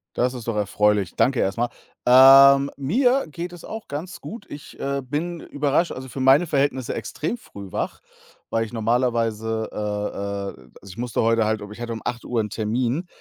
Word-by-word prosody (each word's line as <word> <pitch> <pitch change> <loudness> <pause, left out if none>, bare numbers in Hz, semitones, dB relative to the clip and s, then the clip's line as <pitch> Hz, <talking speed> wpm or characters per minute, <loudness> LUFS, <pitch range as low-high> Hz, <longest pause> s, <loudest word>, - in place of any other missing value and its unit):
Das 125 +1 +1
ist 120 -3 -8
doch 115 -2 -1
erfreulich. 105 -2 +1
Danke 130 -1 +2
erst 95 +3 0
mal. 120 +1 0 0.4
Ähm, 135 +2 +8
mir 245 - +2
geht 170 +4 -6
es 175 - -11
auch 220 0 -7
ganz 155 +6 -6
gut. 215 -2 -9
Ich, 145 - -10
äh, 140 0 -2
bin 155 +6 -3
überrascht 145 +4 0
also, 130 0 -8
für 130 - -7
meine 135 +6 +5
Verhältnisse 135 -4 0
extrem 150 - -4
früh 100 - -11
wach, - - -3 0.5
weil 115 0 0
ich 115 - -12
normalerweise, 115 -1 0
äh - - -9 0.8
äh 65 - -18
also, 100 - -13
ich 90 - -13
musste 120 0 -1
heute 115 0 +3
halt 110 0 0
ob 105 0 -9
ich 105 - -10
hatte 120 -1 -4
um 110 - -6
8:00 120 -1 -2
'n 105 - -4
Termin 120 - -1
125 Hz, 190 wpm, -23 LUFS, 110-145 Hz, 0.8 s, Ähm